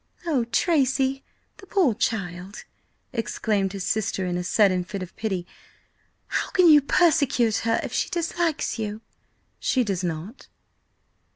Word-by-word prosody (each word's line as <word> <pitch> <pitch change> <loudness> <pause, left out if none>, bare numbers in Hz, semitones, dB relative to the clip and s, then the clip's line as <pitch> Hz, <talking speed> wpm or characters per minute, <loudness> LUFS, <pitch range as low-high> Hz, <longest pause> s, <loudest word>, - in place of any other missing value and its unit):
"Oh, 280 -8 +1
Tracy, 270 0 +1 0.3
the 390 - -14
poor 355 - +3
child!" 190 -3 -3 0.5
exclaimed 210 -4 -1
his 195 -2 -4
sister 210 -3 -1
in 180 -1 -2
a 180 - -2
sudden 185 -1 +3
fit 195 +1 -5
of 185 - -11
pity. 190 -5 -3 0.8
"How - - -2
can 365 -2 +4
you 300 -2 +8
persecute 280 -7 +3
her, 225 0 +1
if - - -6
she - - 0
dislikes 335 -6 -1
you?" 215 0 -4 0.6
"She 255 - +1
does 195 -5 -2
not." 175 - -5
225 Hz, 135 wpm, -24 LUFS, 195-275 Hz, 0.8 s, you